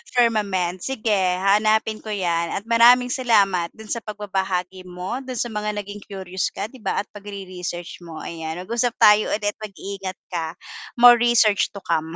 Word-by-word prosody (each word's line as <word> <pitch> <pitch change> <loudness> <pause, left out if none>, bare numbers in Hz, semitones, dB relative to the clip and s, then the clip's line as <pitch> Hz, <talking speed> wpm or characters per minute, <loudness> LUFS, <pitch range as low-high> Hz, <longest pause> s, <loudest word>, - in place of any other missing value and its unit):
Firmament, 200 -7 +1
sige 230 -1 -2 0.2
hahanapin 215 +3 +2
ko - - -14
'yan 170 -5 0
at 200 - -3
maraming 240 +2 +5
salamat 200 -9 +2
dun 220 -1 -10
sa 235 - 0
pagbabahagi 190 -3 -3
mo, 180 +8 -5
dun 260 -2 -7
sa 240 0 -2
mga 210 0 -3
naging 205 +1 -9
curious 190 -2 -3
ka 205 +3 -5
'di 260 - -14
ba 200 -1 -1
at - - -31
pagre-research 185 -4 -7
mo, 165 -1 -9
ayan. 160 -1 -5
Mag-usap 235 +3 -1
tayo 210 0 +6
ulit, 205 -1 -2
mag-iingat 195 -2 -7
ka. 165 -1 -3 0.4
More 240 -1 +8
research 235 -4 +4
to 200 - -8
come. 160 0 -1
205 Hz, 165 wpm, -22 LUFS, 185-220 Hz, 0.4 s, More